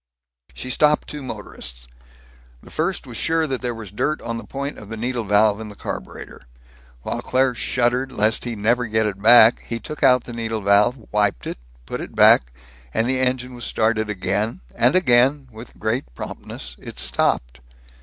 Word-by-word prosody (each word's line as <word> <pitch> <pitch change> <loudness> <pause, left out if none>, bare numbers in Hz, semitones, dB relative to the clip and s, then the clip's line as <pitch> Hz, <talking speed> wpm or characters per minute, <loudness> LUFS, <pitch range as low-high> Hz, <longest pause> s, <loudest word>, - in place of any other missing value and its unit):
She 130 - -5
stopped 150 +4 +3
two 150 - -6
motorists. 95 - -8 0.8
The - - -15
first 170 +2 -2
was 120 -3 -8
sure 160 0 +1
that 135 -4 -3
there 120 -2 -2
was 110 -4 -9
dirt 150 +9 -1
on 115 0 -3
the 115 - -7
point 140 +1 -5
of 105 - -12
the 115 - -6
needle 120 +1 -2
valve, 105 +1 +3
in 110 - -7
the 105 - -11
carburetor. - - -7 0.6
While - - -3
Claire 130 0 +1
shuddered 125 +2 0
lest 110 -1 +1
he 120 -2 -3
never 115 +3 +1
get 110 0 +1
it 100 -2 -3
back, 115 +1 +7
he 115 - -3
took 150 +7 -8
out 125 -3 +5
the 120 - -9
needle 115 -1 -3
valve, 105 +4 +3
wiped 105 -11 +1
it, - - -5 0.3
put - - -5
it - - -8
back - - +6 0.4
and 115 - 0
the 130 0 0
engine 125 0 0
was 120 -1 -6
again - - -2
started, 110 -1 0 0.2
and 125 +6 +3
again, 135 -4 +3
with 110 +2 -12
great 110 +5 -1
promptness, 60 -1 -8
it - - -10
stopped. - - 0
115 Hz, 185 wpm, -22 LUFS, 105-130 Hz, 0.8 s, back